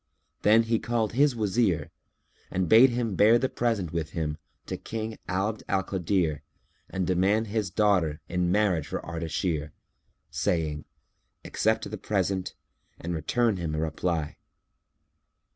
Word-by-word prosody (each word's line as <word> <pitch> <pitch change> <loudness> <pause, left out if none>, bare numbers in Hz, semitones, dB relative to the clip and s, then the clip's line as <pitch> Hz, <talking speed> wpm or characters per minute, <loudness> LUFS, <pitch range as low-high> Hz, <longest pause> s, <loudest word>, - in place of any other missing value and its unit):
Then 110 +2 +5
he 115 0 +1
called 115 -3 -1
his 140 +1 +3
Wazir 105 -7 0 0.6
and 95 -1 -1
bade 115 +8 +8
him 120 -3 -1
bear 105 +5 +6
the 130 - 0
present 110 -10 -1
with 80 -1 -3
him[FN#301] 75 -2 -2 0.3
to - - -4
King 110 0 -5
Abd 100 +4 -1
al 95 -1 +1
Kadir 90 -5 0 0.5
and 95 -1 -2
demand 95 +5 +2
his 105 -2 -2
daughter 90 -6 +2
in 90 -1 0
marriage 90 -6 +2
for - - -5
Ardashir, 80 -2 -2 0.6
saying, 75 -3 -1 0.6
"Accept - - 0
the - - -5
present 95 -2 -1 0.4
and 85 +1 -4
return 105 +7 +1
him 80 -3 -3
a - - -1
reply." 80 0 -2
95 Hz, 135 wpm, -27 LUFS, 80-110 Hz, 0.6 s, bade